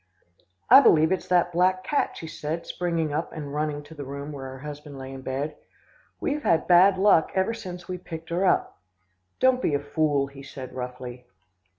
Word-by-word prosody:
"'I 275 - +11
believe 160 - +5
it's 190 - -1
that 175 -1 +3
black 185 +2 +2
cat,' 290 - -1
she - - -7
said, 160 +1 -5
springing 165 -4 -2
up 155 +3 -2
and 145 -3 -7
running 150 -1 -2
to 145 +2 -13
the 145 -2 -7
room 140 +2 -6
where 140 -2 -7
her 130 0 -8
husband 145 0 -9
lay 135 0 -8
in 135 - -8
bed. 135 +4 -3 0.6
'We've 295 +1 -1
had 165 - +2
bad 185 +2 +6
luck 190 -5 +4
ever 190 +4 +1
since 180 -5 -8
we 180 -1 -4
picked 165 -2 -9
her 175 +3 0
up.' 190 - +1 0.6
"'Don't 260 -1 +4
be 145 - +1
a - - +1
fool,' 145 -1 0
he 140 0 -12
said 135 -2 -9
roughly. 125 -1 -7
155 Hz, 195 wpm, -26 LUFS, 140-180 Hz, 0.6 s, I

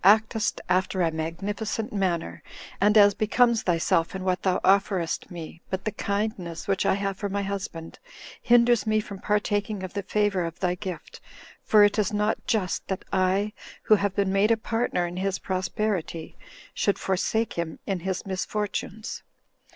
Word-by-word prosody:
actest 215 +2 +4
after 185 0 +1
a 165 - +2
magnificent 200 +8 -3
manner, 170 - -1 0.4
and 210 +2 +5
as 205 -1 +7
becomes 225 +3 +3
thyself 165 0 +1
in 190 - -4
what 185 -1 0
thou 185 -1 +1
offerest 190 -3 +2
me; 170 -1 -8
but 190 0 -3
the 215 - 0
kindness 200 -5 -3
which 195 0 +1
I - - +4
have 195 -1 -2
for 200 0 -3
my 200 +1 -1
husband 195 -4 -5 0.4
hinders 240 -1 +4
me 215 0 +3
from 200 -2 -7
partaking 205 -1 0
of 185 - -6
the 200 - -2
favor 205 -2 +1
of 165 0 -5
thy 180 -2 +1
gift; 180 -3 -7 0.4
for 210 -1 +5
it 205 +1 +3
is 205 -1 +1
not 210 +1 0
just 190 -6 0
that 190 - -4
I, 190 +2 +2 0.3
who - - +5
have 200 -2 +2
been 195 -1 +1
made 200 +2 +3
a 230 - +4
partner 225 -5 -1
in 175 +1 -5
his 195 +1 -1
prosperity, 185 -3 -2 0.4
should 200 - +1
forsake 220 +4 0
him 170 -2 -3
in 195 -2 -1
his 185 +1 -3
misfortunes." 210 +2 -3
195 Hz, 165 wpm, -26 LUFS, 185-210 Hz, 0.4 s, as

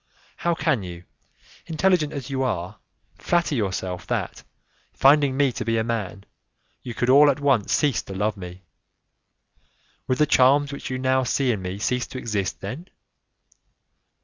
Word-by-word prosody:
How 170 -1 0
can 155 -8 0
you, 90 -2 -8 0.6
intelligent 165 -2 +1
as 140 -2 -6
you 135 -1 -1
are, 90 -9 -3 0.4
flatter 170 -3 +1
yourself 95 -6 -3
that, - - -3 0.5
finding 140 -1 +4
me 140 -2 +3
to - - -5
be 115 0 0
a 110 - +1
man, 105 -4 -4 0.6
you 120 -2 -7
could 120 - -1
all 145 +3 +7
at 140 - 0
once 135 -8 +1
cease 140 - +2
to 95 - -9
love 105 +2 0
me? 90 -1 -10 1.4
Would 130 - +1
the 150 - +4
charms 140 +1 +4
which 140 - -6
you 130 - -2
now 130 0 +1
see 130 +1 +1
in 105 -5 -3
me 90 +1 -5
cease 125 +4 -1
to - - -8
exist 105 -6 -3
then? 130 - -6
130 Hz, 160 wpm, -24 LUFS, 100-145 Hz, 1.4 s, all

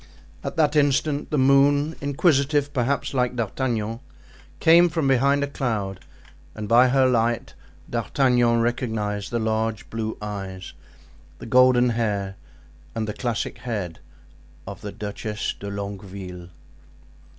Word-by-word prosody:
At - - -4
that 155 -2 +2
instant, 145 0 +1
the 150 - 0
moon, 140 +3 +4
inquisitive, 145 0 +2
perhaps, 140 +1 -1
like 125 -1 0
D'Artagnan, 115 -1 -2 0.6
came 170 +1 +6
from 160 -3 -1
behind 140 +2 +3
a - - -1
cloud 110 -9 -3 0.6
and 110 -1 -5
by 120 +4 +6
her 130 +1 +3
light 120 -1 0 0.3
D'Artagnan 120 0 +2
recognized 110 -4 -2
the 120 - -1
large 110 -1 -1
blue 110 -1 -3
eyes, 95 -3 -6 0.6
the - - -10
golden 125 +1 +5
hair 105 -4 -1 0.6
and 110 -1 -2
the 105 - -3
classic 120 -1 -3
head 100 -9 -4 0.7
of - - -8
the - - -6
Duchess 105 +1 -4
de 100 - -6
Longueville. 100 -3 -7
120 Hz, 125 wpm, -24 LUFS, 105-140 Hz, 0.7 s, came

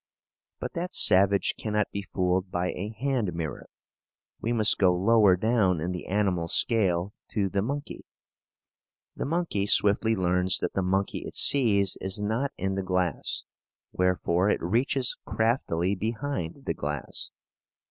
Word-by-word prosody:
But - - -6
that 175 +1 -4
savage 100 0 +4
cannot 105 -1 -1
be 100 - -4
fooled 95 -1 -1
by 90 0 -2
a 100 +3 -5
hand 115 -4 -2
mirror. 80 -3 -5 0.7
We 115 - -2
must 110 -3 +3
go 90 -2 +4
lower 100 0 +4
down 95 -3 +1
in 85 +4 -3
the 90 - -6
animal 95 -4 0
scale, 95 -2 +1 0.2
to 100 -2 0
the 100 +1 -1
monkey. 140 +7 -5 1.1
The - - -4
monkey 160 - -1
swiftly 105 +2 +5
learns 90 0 +1
that 90 - -3
the 95 - -1
monkey 95 +2 -1
it - - -9
sees 100 -8 +4
is 95 +1 -4
not 110 +7 -2
in 95 +1 -2
the 95 - -2
glass, 90 -4 -2 0.5
wherefore 90 +1 +1
it - - -1
reaches 125 - +1
craftily 105 -6 0
behind 115 - -4
the - - -1
glass. 75 -2 -5
100 Hz, 145 wpm, -26 LUFS, 90-110 Hz, 1.1 s, swiftly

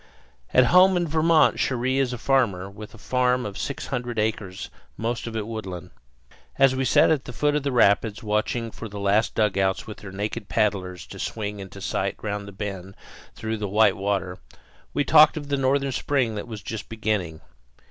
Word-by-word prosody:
At 130 - +5
home 185 0 +7
in 175 -1 0
Vermont 160 0 +3
Cherrie 130 +1 0
is 130 -2 +1
a 125 - -4
farmer, 115 -8 +1
with 105 +2 -11
a - - -12
farm 125 +1 +1
of 100 -2 -6
six 140 - -4
hundred 125 -3 -4
acres, 105 -3 -2 0.3
most 115 +1 -3
of 115 - -6
it 110 -2 -2
woodland. 100 -6 -6 0.7
As 135 -1 +5
we 135 0 0
sat - - +5
at 145 -4 0
the - - -7
foot 145 +4 0
of 150 - +1
the 140 0 -2
rapids, 110 -2 +2
watching 110 +2 -1
for 115 - -8
the 100 0 -7
last 100 +3 +1
dugouts 95 -3 +1
with 110 - -8
their 95 - -10
naked 105 +2 -4
paddlers 95 -5 -1
to - - -11
swing 105 -2 -4
into 100 0 -9
sight 95 +1 -1
round 105 -1 -3
the - - -8
bend 95 -1 -6 0.4
through 110 0 -3
the 105 -2 -3
white 105 0 +4
water, 95 -2 -2 0.5
we 145 - 0
talked 155 +3 +6
of 145 -2 -6
the 140 - +1
northern 135 +1 +1
spring 130 -4 0
that 105 +1 -5
was 110 -3 -8
just 110 -1 -6
beginning. 105 -8 -2
110 Hz, 195 wpm, -24 LUFS, 100-130 Hz, 0.7 s, home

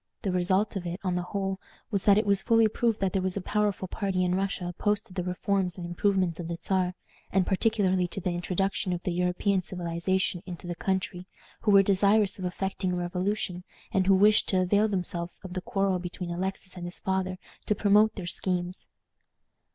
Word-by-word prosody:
The 195 - 0
result 185 +4 +1
of 180 -2 -3
it, 175 +2 -4
on 185 -2 0
the 180 - 0
whole, 195 +1 -3 0.3
was, 200 -3 -1
that 200 -1 +6
it 215 - +2
was 200 -1 +2
fully 225 -2 +4
proved 225 0 0
that 190 -2 +1
there 195 - +1
was 185 +1 -2
a - - 0
powerful 205 -1 0
party 190 -1 -1
in 180 - +1
Russia 190 -1 -1
opposed 205 +4 -1
to 185 - -14
the 180 -1 -2
reforms 185 0 -1
and 175 - -5
improvements 180 -1 0
of 170 - -4
the 170 - -3
Czar, 185 -2 0 0.4
and 190 -1 +3
particularly 190 -3 +2
to 175 - -5
the 180 -1 -1
introduction 180 +2 -1
of 175 - -4
the 180 - -1
European 180 +2 +1
civilization 180 +1 -1
into 175 -1 -7
the 175 - -3
country, 185 0 -2 0.3
who 215 - 0
were 195 -1 +7
desirous 200 +1 +3
of 185 - -3
effecting 190 0 -2
a - - 0
revolution, 180 +1 -2 0.3
and 190 -4 +1
who 195 - +6
wished 210 +2 +5
to 185 -1 +3
avail 205 +4 +3
themselves 180 -3 -3
of 185 -2 -7
the 185 - -3
quarrel 195 0 0
between 180 0 -5
Alexis 185 +1 -4
and 175 -1 -6
his 175 - -5
father 190 -1 -1 0.3
to 210 - +2
promote 210 +2 +4
their 190 - -5
schemes. 180 0 -2
190 Hz, 205 wpm, -28 LUFS, 180-200 Hz, 0.4 s, were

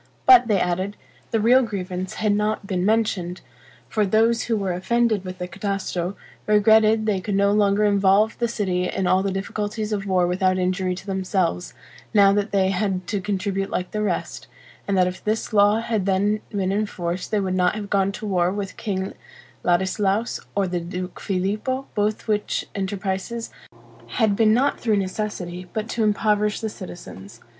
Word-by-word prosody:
But, 250 -2 +8
they 205 -4 +2
added, 185 +4 -1 0.3
the 225 - +1
real 245 +5 +5
grievance 185 -3 -4
had 215 -1 +1
not 210 0 -1
been 185 -2 -1
mentioned: 195 -4 0 0.5
for 215 - 0
those 225 +3 +2
who 230 -2 0
were 195 -3 -1
offended 220 +2 +1
with 185 -1 -7
the 180 - -4
Catasto, 190 -1 -3 0.3
regretted 220 +1 +4
they 200 -3 0
could 205 0 -2
no 200 0 +3
longer 205 0 +3
involve 200 +2 +3
the 235 - +1
city 185 -5 -1
in 195 - -2
all 185 +1 +3
the 195 - -1
difficulties 210 +2 -3
of 200 -1 -3
war 185 -2 +3
without 185 +1 +1
injury 185 0 0
to 185 - -10
themselves, 190 - -1 0.4
now 200 -1 +6
that 205 +1 0
they 190 -1 +2
had 190 -1 -1
to 205 -3 -1
contribute 195 0 -2
like 180 - -3
the 210 - -2
rest; 210 - -3 0.4
and 200 -1 +1
that 185 - +5
if 180 0 -5
this 220 +1 -2
law 205 +1 +5
had 220 -4 -1
then 205 +2 +1
been 195 -2 -1
in 210 +2 0
force 175 -1 -4
they 210 - 0
would 190 -2 -1
not 180 +1 +2
have 205 -2 -6
gone 195 -1 +2
to 215 - -7
war 180 -3 +1
with 200 -1 -5
King 190 -2 -3 0.5
Ladislaus, 195 +5 +1 0.2
or 200 -1 +1
the 175 0 -2
Duke 180 +2 -6
Filippo, 215 +8 -2
both 210 +2 -1
which 210 -1 -1
enterprises 195 +3 -3 0.7
had 215 -2 +3
been 215 0 +4
not 260 +6 +2
through 220 -3 +1
necessity, 185 -2 -4
but 215 0 -2
to 230 - -1
impoverish 210 0 +1
the 220 - -3
citizens. 115 - -10
200 Hz, 180 wpm, -23 LUFS, 185-215 Hz, 0.7 s, But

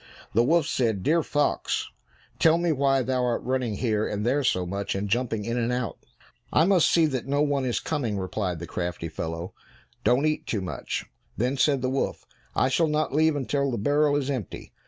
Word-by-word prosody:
The 115 - +4
wolf 160 +5 +3
said, 110 -9 0
"Dear 165 +3 +3
fox, 145 -1 -1 0.5
tell 165 0 +5
me 170 -1 +1
why 135 -2 +2
thou 130 0 0
art 120 -1 0
running 125 -4 -1
here 110 -2 0
and 105 +1 -3
there 140 +4 +2
so 95 -8 +1
much, 100 +3 -3
and 100 +1 -2
jumping 115 -1 -1
in 115 +1 -1
and 120 +1 0
out?" 125 -8 -2 0.5
"I 160 - +4
must 185 -3 +4
see 165 -2 +4
that 130 -5 -2
no 145 +2 +2
one 140 -2 0
is 120 - 0
coming," 125 -10 -2
replied 95 -1 -2
the 85 - -6
crafty 85 0 -4
fellow. 80 +2 -5 0.5
"Don't 130 +5 +3
eat 155 0 -1
too 105 - -1
much!" 90 -4 -4 0.3
Then 125 +5 0
said 140 -1 +2
the 130 - +1
wolf, 135 - -2 0.3
"I - - +3
shall 160 +5 +2
not 155 -2 0
leave 155 +1 +3
until 140 0 0
the 120 - -2
barrel 145 +6 +2
is 140 -1 0
empty." 125 -9 -5
130 Hz, 200 wpm, -26 LUFS, 105-145 Hz, 0.5 s, tell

